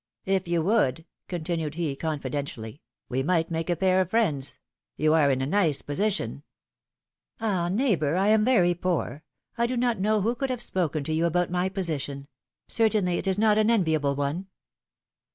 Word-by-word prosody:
If 190 -2 0
you 170 -1 +1
would/^ 165 - +1 0.2
continued 165 -3 -3
he, 165 -5 -2
confidentially, 140 -5 -4 0.3
^^we 130 +2 0
might 165 +1 +1
make 165 +1 -2
a 175 - +2
pair 185 +2 +3
of 185 - -2
friends; 155 - +1 0.4
you 155 +1 +3
are 155 -3 +4
in 130 -1 +1
a - - 0
nice 160 -2 +1
position 200 +8 -1 0.5
— - - -52
'^Ah! 190 -6 0
neighbor, 190 - +1
I 195 +3 +2
am 215 0 +4
very 185 -8 +4
poor; 175 -4 -2 0.4
I 235 - +3
do 250 +1 -2
not 240 -3 +1
know 210 +2 +2
who 225 +5 +1
could 270 +2 -3
have 250 -2 -2
spoken 165 -8 -1
to 155 - -2
you 165 +2 +2
about 175 +1 0
my 180 +1 0
position; 150 -7 -3 0.4
certainly, 210 -6 +2
it - - -5
is 190 0 +1
not 215 0 +4
an 215 +1 +3
enviable 160 -10 +2
one 145 +7 -2
175 Hz, 180 wpm, -26 LUFS, 155-205 Hz, 0.5 s, are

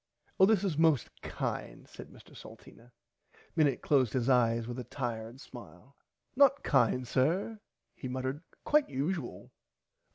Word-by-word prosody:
Oh 190 - +7
this 210 -3 +3
is 170 -6 -1
most 160 -6 +3
kind - - -5
said - - -11
Mr - - -17
Salteena. 120 +2 -14 0.6
Minnit 150 -4 +2
closed 130 -6 +2
his 130 0 0
eyes 115 -2 +3
with 120 +1 -5
a - - -4
tired 120 -2 -5
smile. 120 - -13 0.4
Not 280 +1 +4
kind 125 -1 +2
sir 180 - 0 0.3
he 130 - -7
muttered 130 +3 -4 0.2
quite 300 -1 +2
usual. 140 +1 -4
130 Hz, 135 wpm, -31 LUFS, 120-165 Hz, 0.6 s, Oh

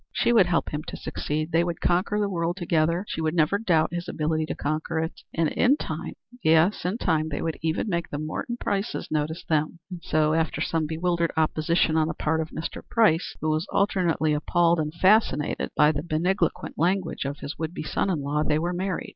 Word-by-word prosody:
She 240 - +2
would 205 -6 +6
help 170 -2 +1
him 150 - -3
to - - -6
succeed; 155 +2 -3
they 165 +1 +3
would 175 -1 -3
conquer 185 +4 +1
the 205 - +1
world 170 -2 -2
together; 170 +1 +1
she 160 - -3
would 160 +1 0
never 165 +5 +2
doubt 170 -7 +2
his 175 0 -4
ability 155 0 -1
to - - -3
conquer 155 +2 -2
it. 160 +1 -3
And 165 -2 +1
in 265 +4 +3
time 160 - -5 0.3
yes, 165 +5 +3
in 185 +5 0
time 160 -7 0
they 145 - -3
would 165 -1 -3
make - - -30
even 165 +6 0 0.2
the 145 - -4
Morton 155 +10 -4
Prices 200 +2 -2
notice 155 +1 -2
them. 155 +1 0
And 175 -2 -6
so 155 -1 +1
after 160 0 0
some 160 -2 0
bewildered 170 +1 0
opposition 160 +1 +2
on 155 -1 +3
the - - -3
part 160 +1 0
of 160 - -5
Mr. 160 - -5
Price, 205 -8 +2
who 155 - +1
was 155 +5 -1
alternately 175 -6 +1
appalled 170 +3 +2
and 150 -1 -1
fascinated 175 -4 +2
by 150 0 +6
the 145 -2 -3
magniloquent 170 +2 -1
language 180 +2 0
of 140 +1 -3
his 145 - -7
would 160 +2 -3
be - - -4
son 195 - -1
in 160 -6 -1
law, 145 +2 0
they 150 0 +1
were 170 +3 -1
married. 185 0 -3
160 Hz, 215 wpm, -25 LUFS, 155-175 Hz, 0.3 s, would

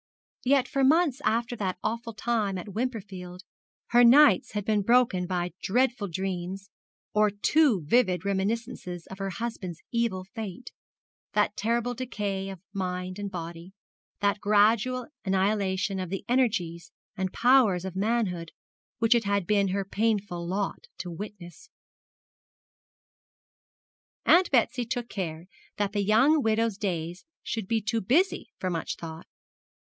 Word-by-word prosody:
Yet 265 0 +3
for 275 +1 0
months 290 -1 +3
after 235 +2 0
that 190 -3 -2
awful 230 0 -3
time 215 -5 0
at 185 +2 -7
Wimperfield 190 -6 -5 0.5
her 240 +1 +6
nights 240 -4 +6
had 205 -2 -2
been 215 -1 +2
broken 230 -5 +3
by 175 -1 -2
dreadful 240 0 +1
dreams 190 +1 -4 0.4
or 210 0 +4
too 210 - +2
vivid 185 0 +2
reminiscences 200 -2 -2
of 190 - -10
her 195 0 -2
husband's 185 -5 -5
evil 230 -6 0
fate, 215 +3 -7 0.6
that - - +2
terrible 235 +2 0
decay 205 -6 -3
of 190 -2 -8
mind 185 -1 -3
and 200 -1 -3
body, 170 0 -7 0.5
that 205 0 +2
gradual 220 +4 +3 0.2
annihilation 190 0 0
of 185 -2 -4
the 195 +1 -4
energies 215 -10 0 0.2
and 190 -1 -2
powers 235 -8 +4
of 190 -1 -5
manhood 195 -5 -1 0.5
which 225 +1 +4
it 235 -2 +1
had 200 -2 +1
been 200 +1 +2
her 195 +1 -1
painful 200 -4 -1
lot 195 +2 -3
to 175 0 -6
witness. 175 -1 -9 2.6
Aunt 360 +1 +6
Betsy 245 -1 +2
took 240 0 -4
care 165 -4 -4 0.3
that 205 -1 0
the 205 -1 +1
young 265 +10 +4
widow's 225 -2 +1
days 175 -2 -3 0.2
should 220 -4 -3
be 225 +1 +1
too 225 +2 0
busy 325 - +1
for 185 - -2
much 165 -2 -3
thought. 160 0 -9
205 Hz, 135 wpm, -27 LUFS, 185-235 Hz, 2.6 s, her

